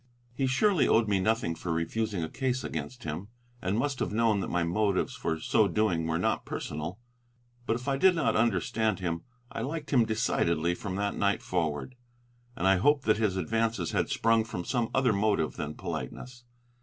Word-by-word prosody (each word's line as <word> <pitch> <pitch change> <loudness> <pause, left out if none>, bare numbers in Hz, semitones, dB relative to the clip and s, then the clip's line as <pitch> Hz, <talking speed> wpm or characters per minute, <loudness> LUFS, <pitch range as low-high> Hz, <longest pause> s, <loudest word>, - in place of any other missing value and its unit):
He 135 +2 0
surely 180 +7 +3
owed 110 -1 +4
me 100 -2 +2
nothing 110 -4 +1
for 85 +1 -5
refusing 90 +3 -1
a - - -2
case 130 - -2
against 120 -1 -5
him, 80 +5 -4 0.3
and 95 +3 0
must 135 +2 -1
have - - -1
known 110 -1 +2
that - - -2
my 90 -1 +1
motives 100 +7 +1
for 80 -10 -2
so 105 +6 +3
doing 90 -4 +1
were 80 0 0
not 90 - 0
personal. 80 +6 -5 0.7
But 110 - +2
if 125 +3 -6
I 135 -1 +1
did 185 +4 +5
not 115 -9 +1
understand 110 -1 +1
him, 85 -2 -2 0.3
I - - -4
liked 150 +4 -4
him 125 -5 +5
decidedly 85 -7 +1
from 95 +1 -5
that 100 +1 -1
night 100 0 +1
forward, 80 - -2 0.6
and 90 - 0
I 95 0 +5
hoped 145 +7 +3
that 110 -1 +4
his 105 -4 0
advances 110 0 0
had - - 0
sprung 115 -1 +3
from 90 -6 -5
some 120 -2 0
other 130 -4 +3
motive 100 -6 +1
than 75 +1 -4
politeness. 125 -1 -6
105 Hz, 190 wpm, -29 LUFS, 90-120 Hz, 0.7 s, did